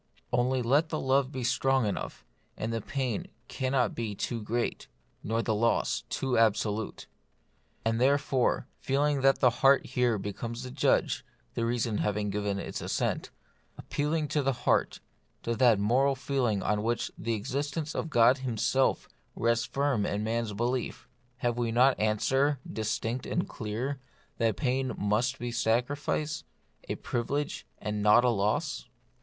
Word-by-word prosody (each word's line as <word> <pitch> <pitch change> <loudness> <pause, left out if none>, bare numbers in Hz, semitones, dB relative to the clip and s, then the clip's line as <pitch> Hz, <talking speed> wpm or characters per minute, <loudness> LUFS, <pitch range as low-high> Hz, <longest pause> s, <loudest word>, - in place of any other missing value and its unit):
Only 125 +1 +2
let 145 +7 +3
the 155 - -2
love 135 0 +2
be 130 -2 -4
strong 130 +1 +2
enough, 100 -10 -4 0.3
and 115 +1 -3
pain 130 -6 -2 0.2
cannot 130 -1 0
be 110 -3 -3
too 115 +3 -3
great, 115 +3 -2 0.3
nor 115 +2 -1
loss 115 +1 +1
too 130 -3 0
absolute. 110 -1 +1 0.8
And 115 +1 +1
therefore, 135 -1 +2
feeling 140 +1 +1
that 135 0 +4
the 125 -3 +6
heart 135 0 +6
here 125 -3 +1
becomes 115 +5 -5
the 130 - -7
judge - - +1 0.3
(the 115 - -1
reason 115 -2 0
having 105 0 0
given 100 0 -1
its - - -5
assent,) - - -1 0.5
appealing 150 +1 -1
to 150 +1 +1
the 135 0 +1
heart, - - +2 0.4
to 115 - -1
that 120 -2 +5
moral 130 +7 +3
feeling 125 -7 0
on 105 0 +1
which 115 +2 -1
the 115 0 -2
existence 145 +7 -3
of 160 - -3
God 125 0 +5
Himself 130 +1 +1 0.3
rests 115 +1 +1
firm 140 -6 0
in 105 +1 -1
man's 115 -1 -1
belief, 120 +4 -2 0.3
have 120 -1 -1
we 115 -1 0
not 125 +3 +4
answer, 135 +7 +2
distinct 115 +3 -2
and 175 - -1
clear, 120 +5 -4 0.4
that 115 -2 +1
pain 130 -1 0
must 110 +6 +1
be 120 0 -4
sacrifice; 135 +6 0 0.5
a - - -1
privilege, 140 +5 -3
and 105 0 -3
not 105 +3 +6
a - - +5
loss 105 -1 -1
120 Hz, 145 wpm, -29 LUFS, 110-135 Hz, 0.8 s, the